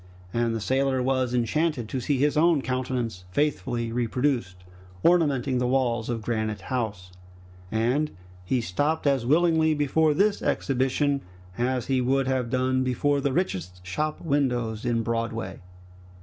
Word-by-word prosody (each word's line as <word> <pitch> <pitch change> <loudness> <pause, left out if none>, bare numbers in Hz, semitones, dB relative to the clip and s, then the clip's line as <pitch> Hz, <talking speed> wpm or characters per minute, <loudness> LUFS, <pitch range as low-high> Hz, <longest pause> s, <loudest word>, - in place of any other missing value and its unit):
And 115 -1 +1
the - - -2
sailor 130 +3 +1
was 130 -1 +1
enchanted 125 +1 0
to 130 - -2
see 140 +2 0
his 145 +3 +2
own 155 -2 +4
countenance, 125 -7 -2
faithfully 120 -2 -1
reproduced, 120 -5 -1 0.4
ornamenting 140 -7 +3
the 125 - +1
walls 125 -3 +1
of 115 -2 -2
Granite 110 -3 -2
House, 100 -6 -3 0.6
and 125 +7 +1 0.3
he 125 +7 0
stopped 145 - -1
as 135 -4 +2
willingly 160 +1 +3
before 150 +1 +2
this 200 +4 +2
exhibition 135 +1 0 0.3
as 125 0 0
he 130 -2 +1
would 135 +1 +1
have 130 -3 0
done 130 +1 +1
before 140 +3 +1
the 140 0 0
richest 90 - -2
shop 150 +12 -2
windows 125 -7 -1
in 115 -1 +1
Broadway. 115 -4 -3
130 Hz, 140 wpm, -26 LUFS, 115-145 Hz, 0.6 s, own